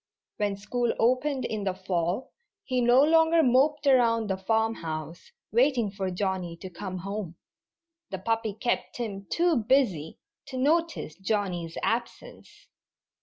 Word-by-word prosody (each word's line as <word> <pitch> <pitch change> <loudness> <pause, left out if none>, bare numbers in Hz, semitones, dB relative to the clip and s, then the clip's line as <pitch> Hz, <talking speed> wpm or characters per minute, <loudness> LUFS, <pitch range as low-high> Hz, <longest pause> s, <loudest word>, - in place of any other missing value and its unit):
When 205 -1 -1
school 235 +4 -1
opened 255 +3 +1
in 215 -2 -3
the 190 -2 -1
fall 185 +3 -2 0.3
he 255 -2 0
no 245 +3 +5
longer 325 +1 +5
moped 280 +4 +3
around 230 -5 +3
the - - +1
farmhouse, 180 -7 -2 0.2
waiting 240 -3 +2
for 195 -1 -3
Johnnie 185 -2 -2
to 185 +1 -9
come 185 +1 -6
home. 195 -1 -5 0.7
The 190 - -4
puppy 225 +1 -1
kept 240 +3 -2
him 200 -5 -5
too 340 -3 +2
busy 220 - +1 0.3
to 265 -1 -6
notice 320 - 0
Johnnie's 185 -4 -2
absence. 235 - -4
220 Hz, 130 wpm, -27 LUFS, 190-255 Hz, 0.7 s, no